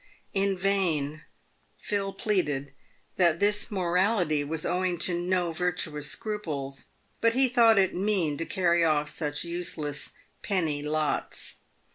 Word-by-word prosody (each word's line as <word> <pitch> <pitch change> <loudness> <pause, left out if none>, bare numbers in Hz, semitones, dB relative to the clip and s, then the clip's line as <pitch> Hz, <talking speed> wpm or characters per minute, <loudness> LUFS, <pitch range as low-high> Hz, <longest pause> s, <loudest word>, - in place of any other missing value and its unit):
In 195 -1 +1
vain 170 -7 0 0.6
Phil 200 -1 -2
pleaded 150 -10 -1 0.4
that 170 -3 +3
this 205 +1 +2
morality 180 -4 +1
was 155 +2 -3
owing 180 0 0
to 180 - +3
no 175 0 0
virtuous 160 -3 -1
scruples, 150 -11 -4 0.3
but 230 0 +2
he 265 0 +5
thought 235 -3 +5
it 190 -1 +3
mean 185 -6 +1
to 165 - -2
carry 170 -3 +2
off 150 -2 +2
such 150 -2 -2
useless 170 -4 -3
" - - -39
penny 160 -7 0
lots." 150 0 -2
175 Hz, 130 wpm, -28 LUFS, 150-195 Hz, 0.6 s, he